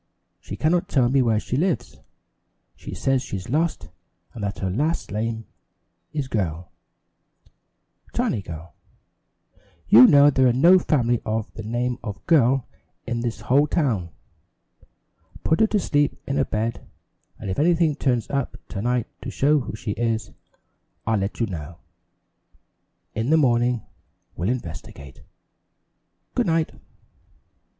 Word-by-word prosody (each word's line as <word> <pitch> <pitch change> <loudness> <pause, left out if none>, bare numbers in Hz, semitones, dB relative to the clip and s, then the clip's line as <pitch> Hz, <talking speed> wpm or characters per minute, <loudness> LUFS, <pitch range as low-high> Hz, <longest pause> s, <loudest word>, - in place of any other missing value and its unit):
She - - -8
cannot 170 +3 +1
tell 125 -4 +3
me 135 +1 +3
where 115 -3 +2
she 120 - -4
lives 175 +3 -1 0.8
she - - -8
says 135 -1 +1
she's 100 -4 -6
lost 160 +3 0 0.4
and 110 - -7
that 100 0 -3
her 95 - -2
last 150 - -1
name 110 +1 -2 0.7
is 145 -4 -3
Girl 90 -8 -3 1.4
Tiny 105 - 0
Girl. 80 -3 -9 1.1
You 120 +3 +9
know 145 0 +7
there 130 -1 +4
is 120 - +2
no 175 +8 +7
family 120 -8 +1
of 110 0 -3
the - - -7
name 120 +3 -2
of 105 -4 -7
Girl 135 -5 +3 0.4
in 120 -1 -2
this 115 -1 -3
whole 140 +4 +3
town. 115 - 0 1.3
Put 160 - +2
her 220 - +5
to 215 - +1
sleep 145 -5 +1
in 140 +1 -1
a 135 - +2
bed 110 +2 -2 0.6
and 95 - -5
if 95 - -3
anything 165 0 +3
turns 125 -6 0
up 140 -2 -2
to 100 - -4
night 120 0 0 0.2
to - - -5
show 150 +2 +3
who 120 - -6
she 110 0 -4
is, 115 0 -1 0.7
I'll 110 -1 +1
let 100 +2 -3
you 115 - +2
know. 85 -4 -7 1.4
In 115 +4 -2
the 160 - +5
morning 120 -4 +2 0.5
we'll 90 +4 -1
investigate. 80 - -6 1.1
Good - - +1
night." 165 -1 +1
120 Hz, 140 wpm, -23 LUFS, 110-145 Hz, 1.4 s, You